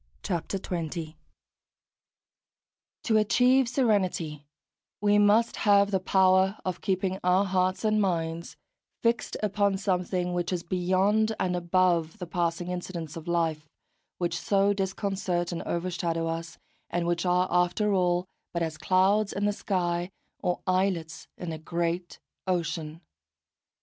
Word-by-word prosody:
XX 185 +2 -3
SERENITY 165 -2 -4 1.9
To 220 -2 +3
achieve 250 +4 +4
serenity 185 - 0 0.5
we 205 0 +3
must 210 +3 +4
have 200 -1 +4
the 190 - +2
power 190 +1 +3
of 185 -1 -3
keeping 190 -1 -1
our 180 +2 +3
hearts 185 +2 0
and 215 0 +3
minds 170 -3 -2 0.5
fixed 235 0 0
upon 200 -1 +1
something 180 -2 -1
which 175 0 -1
is 175 -2 -2
beyond 190 +5 +1
and 180 -1 0
above 175 -1 +1
the 180 - -5
passing 175 +1 -2
incidents 175 -3 -5
of 165 0 -8
life, 160 -3 -1 0.5
which 170 -2 -1
so 200 +2 +3
disconcert 190 -2 -2
and 170 - -3
overshadow 170 -1 -1
us, 165 0 -4 0.3
and 175 0 -1
which 170 0 0
are 180 0 +2
after 180 +4 +2
all 180 -1 +2 0.3
but 170 -1 0
as 160 -1 -4
clouds 195 +3 +3
in 205 - -1
the 205 - +2
sky, 175 -3 -1 0.3
or 180 - -1
islets 185 -4 -1
in 175 -2 -5
a 160 - -5
great 170 +2 -2 0.3
ocean. 165 -3 -2
180 Hz, 130 wpm, -27 LUFS, 170-195 Hz, 1.9 s, achieve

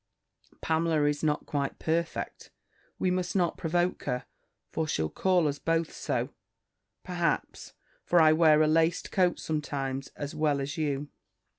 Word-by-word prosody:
"Pamela 160 -1 +1
is 145 0 +1
not 150 -1 +1
quite 140 -2 -2
perfect. 165 +1 -2 0.5
We 185 - +1
must 180 0 -1
not 175 -3 +2
provoke 175 +2 -1
her; 125 -1 -2 0.5
for 160 -1 -1
she'll 80 - -1
call 180 -4 +2
us 145 -1 -2
both 165 -1 0
so, - - -2 0.7
perhaps; 175 -4 -2 0.3
for 175 - +3
I 155 -1 +7
wear 155 -1 +5
a - - +3
laced 165 +2 +2
coat, 180 -2 +2
sometimes, 135 -3 -3
as 145 0 -5
well 150 -2 +1
as 140 +2 -3
you." 145 -2 -2
155 Hz, 145 wpm, -29 LUFS, 145-170 Hz, 0.7 s, I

